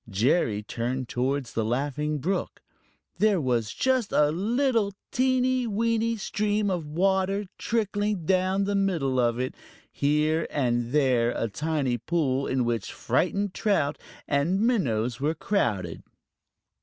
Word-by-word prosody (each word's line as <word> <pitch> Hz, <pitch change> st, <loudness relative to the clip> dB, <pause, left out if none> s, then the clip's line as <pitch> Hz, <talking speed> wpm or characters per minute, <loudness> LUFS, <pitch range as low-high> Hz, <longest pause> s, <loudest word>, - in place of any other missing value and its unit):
Jerry 110 Hz, -, +1 dB
turned 120 Hz, +4 st, -3 dB
towards 130 Hz, 0 st, -1 dB
the 115 Hz, -, 0 dB
Laughing 145 Hz, +6 st, -1 dB
Brook. 180 Hz, +6 st, -3 dB, 0.6 s
There 210 Hz, -3 st, +3 dB
was 120 Hz, -6 st, 0 dB
just 260 Hz, -5 st, 0 dB
a 150 Hz, 0 st, +3 dB
little, 220 Hz, -, +1 dB, 0.2 s
teeny, 255 Hz, -1 st, +2 dB
weeny 230 Hz, +1 st, 0 dB
stream 210 Hz, 0 st, 0 dB
of 170 Hz, -4 st, -2 dB
water 190 Hz, +5 st, +1 dB
trickling 205 Hz, -4 st, -1 dB
down 190 Hz, +2 st, +2 dB
the 200 Hz, +1 st, -1 dB
middle 170 Hz, -10 st, +1 dB
of 120 Hz, -1 st, +2 dB
it, 130 Hz, +1 st, -2 dB
with -, -, -25 dB, 0.3 s
here 150 Hz, +3 st, +1 dB
and 120 Hz, -4 st, 0 dB
there 130 Hz, -5 st, +3 dB
a 115 Hz, -, 0 dB
tiny 140 Hz, -1 st, -1 dB
pool 140 Hz, -3 st, 0 dB
in 130 Hz, -2 st, 0 dB
which 115 Hz, -4 st, -2 dB
frightened 200 Hz, -1 st, 0 dB
trout 195 Hz, -10 st, 0 dB, 0.3 s
and 155 Hz, +7 st, +1 dB
minnows 125 Hz, -, +1 dB
were 150 Hz, +4 st, 0 dB
crowded. 105 Hz, -, -1 dB
155 Hz, 130 wpm, -26 LUFS, 130-205 Hz, 0.6 s, There